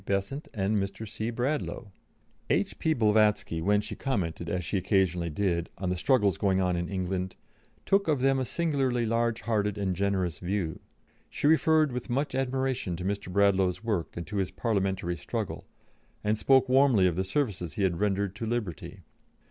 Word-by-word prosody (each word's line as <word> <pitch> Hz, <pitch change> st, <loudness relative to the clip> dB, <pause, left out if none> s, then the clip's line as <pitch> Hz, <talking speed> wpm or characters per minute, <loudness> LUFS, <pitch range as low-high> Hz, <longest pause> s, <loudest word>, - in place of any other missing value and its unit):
Besant 100 Hz, -, -2 dB
and 105 Hz, 0 st, 0 dB
Mr. 100 Hz, +3 st, -3 dB
C. 110 Hz, +2 st, -4 dB
Bradlaugh." 120 Hz, -3 st, -2 dB, 0.6 s
H.P. 160 Hz, -1 st, +1 dB
Blavatsky, 105 Hz, -6 st, +2 dB
when 105 Hz, +4 st, +3 dB
she 105 Hz, -, -6 dB
commented, 85 Hz, -, -2 dB
as 90 Hz, -1 st, -2 dB
she 80 Hz, -, -2 dB
occasionally 90 Hz, -3 st, +1 dB
did, 85 Hz, 0 st, -1 dB
on 90 Hz, +1 st, -2 dB
the -, -, 0 dB
struggles 100 Hz, -, +2 dB
going 95 Hz, -2 st, +2 dB
on 90 Hz, -1 st, +1 dB
in 85 Hz, 0 st, -2 dB
England, 95 Hz, -1 st, -2 dB, 0.5 s
took 195 Hz, -1 st, +2 dB
of 150 Hz, -4 st, +2 dB
them 135 Hz, 0 st, +3 dB
a 130 Hz, -, -1 dB
singularly 135 Hz, -7 st, 0 dB
large 115 Hz, 0 st, 0 dB
hearted 105 Hz, -2 st, 0 dB
and 95 Hz, -3 st, -1 dB
generous 95 Hz, -3 st, -1 dB
view. 90 Hz, -3 st, -2 dB, 0.5 s
She -, -, -4 dB
referred 155 Hz, -1 st, +4 dB
with 125 Hz, +1 st, -5 dB
much 135 Hz, +4 st, -1 dB
admiration 130 Hz, -7 st, -1 dB
to 90 Hz, +2 st, -6 dB
Mr. 100 Hz, -1 st, -3 dB
Bradlaugh's 95 Hz, -1 st, +2 dB
work 105 Hz, -9 st, -2 dB
and 85 Hz, -, -4 dB
to 105 Hz, -, -5 dB
his 95 Hz, -2 st, 0 dB
Parliamentary 95 Hz, -5 st, -1 dB
struggle, 70 Hz, -, -4 dB, 0.6 s
and 105 Hz, +1 st, +2 dB
spoke 130 Hz, +4 st, +4 dB
warmly 130 Hz, -6 st, +5 dB
of 90 Hz, -3 st, +2 dB
the 95 Hz, -, 0 dB
services 95 Hz, -, -2 dB
he 100 Hz, -, -1 dB
had 90 Hz, -3 st, +1 dB
rendered 100 Hz, -1 st, 0 dB
to 115 Hz, -, -4 dB
liberty. 110 Hz, -7 st, -4 dB
100 Hz, 170 wpm, -28 LUFS, 95-120 Hz, 0.6 s, warmly